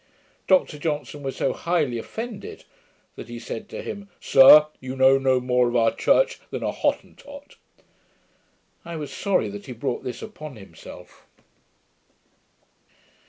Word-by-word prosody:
Dr 180 -5 +2
Johnson 150 -1 -4
was 135 -1 -5
so 135 - -1
highly 155 -9 -1
offended, 220 - -8 0.5
that - - -10
he 120 - -7
said 115 -1 -7
to - - -7
him, 200 -1 -7
'Sir, 145 +3 +8
you 130 0 -7
know 135 +1 +5
no 130 -1 +2
more 125 0 +1
of 120 - -3
our 115 -1 +3
church - - +2
than - - -5
a - - -1
Hottentot.' 285 0 -4 1.3
I 170 0 -7
was 145 -4 -6
sorry 185 - 0
that 100 0 -9
he 125 - -6
brought 125 +1 -4
this 125 -2 -6
upon 155 -10 -9
himself. 100 -3 -14
135 Hz, 140 wpm, -24 LUFS, 125-170 Hz, 1.3 s, Sir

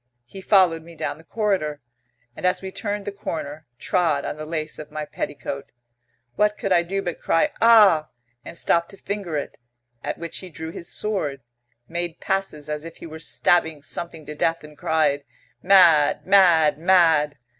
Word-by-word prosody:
He 190 +11 -10
followed 185 -5 +4
me 165 +1 -14
down 155 0 -4
the - - -16
corridor, 185 -7 -1 0.6
and, - - -10
as 180 0 +2
we 190 0 -7
turned 205 0 -4
the 205 - -3
corner, 155 -6 -6
trod 160 -5 0
on - - -3
the 155 0 -7
lace 155 -1 -4
of 150 -1 -8
my 150 0 -5
petticoat. 140 -2 -6 0.6
What 210 0 +2
could 195 - -3
I 175 - +5
do 195 +3 -3
but 175 - -4
cry 165 - +1
'Ah!' 210 -9 +6 0.3
and - - -10
stop 170 0 +1
to 195 - -13
finger 195 -6 -4
it? 145 - -6 0.4
At - - -3
which 170 -1 -5
he 185 - -9
drew 160 -1 -7
his 170 - -7
sword, 170 -11 -2 0.5
made 170 0 -4
passes 175 -7 -2
as 150 0 -4
if 165 0 -10
he - - -10
were 160 -1 -9
stabbing 160 -3 +1
something 165 -1 -6
to 150 - -7
death, 165 +2 0
and 150 0 -13
cried, 145 -2 +1 0.4
'Mad! 175 -6 +5
Mad! 170 -6 +5
Mad!' 165 -5 +4
165 Hz, 175 wpm, -23 LUFS, 150-190 Hz, 0.6 s, Ah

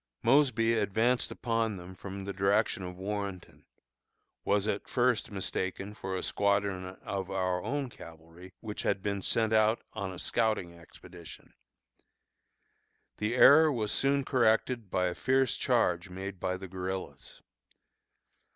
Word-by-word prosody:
Mosby 115 -3 +4
advanced 110 +3 +1
upon 115 -3 -1
them 90 +1 -10
from 95 +1 -8
the 100 - -4
direction 100 +1 +1
of 90 -1 -7
Warrenton 100 -1 -5 0.8
was 100 +1 +1
at 105 -1 -2
first 125 -3 +1
mistaken 95 0 -4
for 95 -2 -5
a - - -4
squadron 100 -2 0
of 95 -2 -4
our 90 -1 -1
own 135 +6 -2
cavalry, 85 -3 -13
which 105 -2 -5
had 95 - -1
been 100 -1 -2
sent 110 +2 +1
out 110 +1 +3
on 100 -3 -4
a 95 - -8
scouting 105 -4 0
expedition. 85 0 -13 1.6
The 105 +3 -1
error 155 +4 +7
was 110 -5 -1
soon 140 0 +2
corrected 115 -3 +1
by 90 0 +1
a 90 - 0
fierce 130 +4 +1
charge 85 +2 +1
made 95 +1 -6
by 95 +1 -2
the 95 +1 -8
guerillas. 90 -8 -6
100 Hz, 135 wpm, -30 LUFS, 95-115 Hz, 1.6 s, error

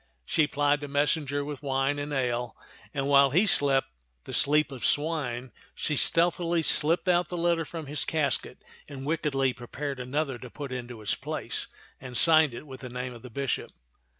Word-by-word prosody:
She 155 - +2
plied 145 0 +1
the 145 - -5
messenger 145 0 0
with 145 -2 -6
wine 135 0 0
and 145 +1 -5
ale, 125 -3 -2 0.3
and 140 -1 -2
while 140 -1 +6
he 175 +10 +3
slept 140 -8 +3 0.3
the - - -9
sleep 150 0 +3
of 130 -3 -8
swine, 135 -6 -1 0.2
she 150 - -1
stealthily 170 +2 +3
slipped 165 +5 +5
out 175 0 +2
the 175 - -4
letter 170 -1 +1
from 160 0 -7
his 145 +2 +1
casket 145 -6 -1 0.2
and 135 -1 -8
wickedly 140 -4 0
prepared 130 +3 -6
another 130 +1 -2
to 125 - -9
put 140 +1 -7
into 120 -3 -7
its 100 - +2
place - - -3 0.3
and 125 -2 -6
signed 155 -6 +5
it 135 - -9
with 130 -3 -10
the 130 - -7
name 125 +1 -5
of 120 - -12
the 125 - -10
bishop. 135 +2 -3
145 Hz, 180 wpm, -27 LUFS, 130-155 Hz, 0.3 s, while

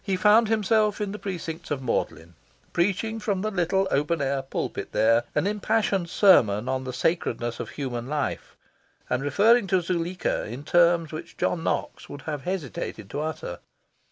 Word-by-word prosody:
He 195 -2 0
found 210 +4 +5
himself 215 -1 +2
in 205 -2 -2
the 210 - -6
precincts 175 -3 -5
of 140 -3 -2
Magdalen, 85 -8 -2 0.4
preaching 205 +5 0
from 205 -3 -1
the 215 - -1
little 190 +1 +1
open 150 +4 +1
air 140 -1 0
pulpit 135 - -4
there 115 +2 +3
an - - +2
impassioned 205 -3 0
sermon 120 - +4
on 130 0 -1
the 130 - -3
sacredness 120 -5 -1
of - - -5
human 125 -4 -4
life, 145 0 -3 0.6
and 125 - +1
referring 205 - +4
to 185 0 +3
Zuleika 175 +1 -2
in 120 +6 -7
terms 170 0 +3
which 155 - -8
John 165 - 0
Knox - - -2
would 145 -1 -9
have 150 -4 -5
hesitated 140 - -4
to 145 - -3
utter. 155 - -4
170 Hz, 165 wpm, -26 LUFS, 135-195 Hz, 0.6 s, found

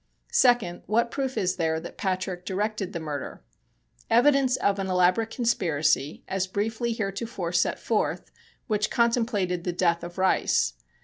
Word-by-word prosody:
Second: 240 -9 +3
What 230 +4 +1
proof 265 -2 -3
is 180 -1 0
there 160 -1 0
that 170 - -9
Patrick 185 -1 -2
directed 205 +1 -2
the 170 - -4
murder? 150 -3 -6 0.7
Evidence 260 +2 +4
of 200 0 +1
an 195 - -2
elaborate 185 +4 +2
conspiracy, 160 - 0
as 190 0 -1
briefly 220 +5 -2
heretofore 200 -3 -3
set 170 - +2
forth, - - -1 0.3
which 215 -1 0
contemplated 225 -7 +1
the 180 - -2
death 170 -1 +1
of 175 +1 -8
Rice. 185 - +2
190 Hz, 140 wpm, -26 LUFS, 175-225 Hz, 0.7 s, Evidence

